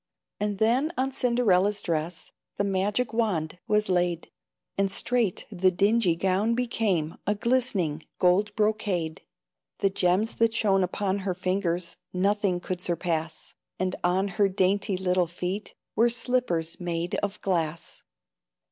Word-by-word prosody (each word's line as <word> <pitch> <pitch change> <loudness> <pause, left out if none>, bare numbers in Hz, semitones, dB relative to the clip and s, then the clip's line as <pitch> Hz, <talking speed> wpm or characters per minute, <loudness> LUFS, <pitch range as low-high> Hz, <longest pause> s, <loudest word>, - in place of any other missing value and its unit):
And 205 -1 -1
then 245 - +2
on 265 +1 0
Cinderella's 210 -6 +2
dress 165 +1 -2 0.3
The - - +1
magic 200 +5 0
wand 180 -8 -1
was 210 -1 +2
laid, 175 -2 0 0.4
And 195 0 +1
straight 230 -1 0
the 190 -1 +3
dingy 200 0 +2
gown 195 +6 +1
became 215 -10 0
A 210 - +2
glistening 205 - 0
gold 200 +3 +2
brocade. 210 -7 0 0.6
The 195 - +1
gems 190 +4 +1
that 230 0 +2
shone 195 -4 +3
upon 190 +2 -1
her 190 -2 -2
fingers 180 -2 -1 0.2
Nothing 195 0 +1
could 180 0 -4
surpass; 165 -2 -2 0.2
And 185 0 -1
on 185 +3 +2
her 200 0 +2
dainty 195 0 +1
little 180 -1 +1
feet 180 +4 -4 0.2
Were 235 +2 +4
slippers 230 -9 -1
made 175 0 -2
of 205 0 -3
glass. 165 -4 -2
195 Hz, 130 wpm, -27 LUFS, 175-215 Hz, 0.6 s, Were